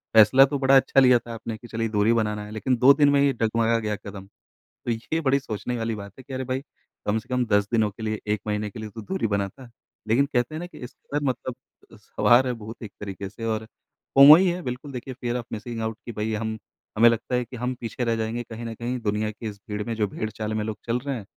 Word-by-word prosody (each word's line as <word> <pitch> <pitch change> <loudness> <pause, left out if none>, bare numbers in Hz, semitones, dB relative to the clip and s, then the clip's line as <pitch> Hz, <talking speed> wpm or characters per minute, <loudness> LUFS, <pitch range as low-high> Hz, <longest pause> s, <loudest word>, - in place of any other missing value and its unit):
फैसला 110 +5 +8
तो 140 +1 -3
बड़ा 135 0 +5
अच्छा 135 0 +4
लिया 125 -2 +6
था 120 0 -9
आपने 115 0 -6
कि 120 - -13
चलिए 115 -1 -2
दूरी 105 +1 +3
बनाना 105 -2 -1
है, 105 - -10
लेकिन 110 +4 0
2 130 +4 +7
दिन 145 0 +4
में 140 0 +4
ही 140 -1 +3
डगमगा 115 0 +1
गया 105 -2 -2
कदम? 100 -2 -10 0.6
तो - - -2
ये 115 +8 -2
बड़ी 140 -3 +3
सोचने 125 -1 -4
वाली 115 0 -1
बात 100 -2 -8
है - - -10
कि 135 - -8
अरे 130 0 -3
भाई, 130 +1 -2 0.5
कम 105 +2 +2
से 120 - -10
कम 125 -1 +1
10 105 -1 +2
दिनों 110 -2 +3
के 105 +3 -12
लिए 110 -1 -2
1 105 - -1
महीने 105 0 -2
के 105 - -10
लिए 110 -1 -6
तो 110 +2 -8
दूरी 190 - -2
बनाता। 100 +5 -3 0.4
लेकिन 125 +6 +3
कहते 125 0 -1
हैं 155 - -4
ना 175 - -5
कि 180 - -13
इस 125 +2 -8 0.2
पर 145 - 0
मतलब, 130 -1 -2 0.4
सवार 120 +4 +3
है 125 - 0
भूत 115 +1 -10
एक 100 - -9
तरीके 100 -1 -5
से 105 +3 -9
और 110 -1 -1 0.5
फोमो 140 +3 +11
ही 185 +2 +3
है 175 +1 -3
बिल्कुल, 130 +2 -5
देखिए 130 +1 -6
फियर 120 -1 -3
ओफ 120 - -6
मिसिंग 115 +1 -5
आउट 110 0 -3
कि 120 - -5
भई 110 +1 -2
हम 110 0 -3 0.4
हमें 120 +1 +8
लगता 115 +2 -1
है 125 0 +1
कि 120 +2 -10
हम 125 +2 -2
पीछे 120 +1 -3
रह 115 -1 +1
जाएँगे 115 +2 -2
कहीं 115 0 -8
न 115 - -5
कहीं 120 +3 -3
दुनिया 105 0 -1
की 110 +2 -9
इस 100 -1 -8
भीड़ 105 0 -3
में 115 - -2
जो 105 -1 +1
भेड़-चाल 110 +1 -4
में 110 -1 -1
लोग 110 -1 -4
चल 120 +1 +1
रहे 140 +1 -3
हैं, 105 -5 -8
115 Hz, 265 wpm, -25 LUFS, 110-125 Hz, 0.6 s, फोमो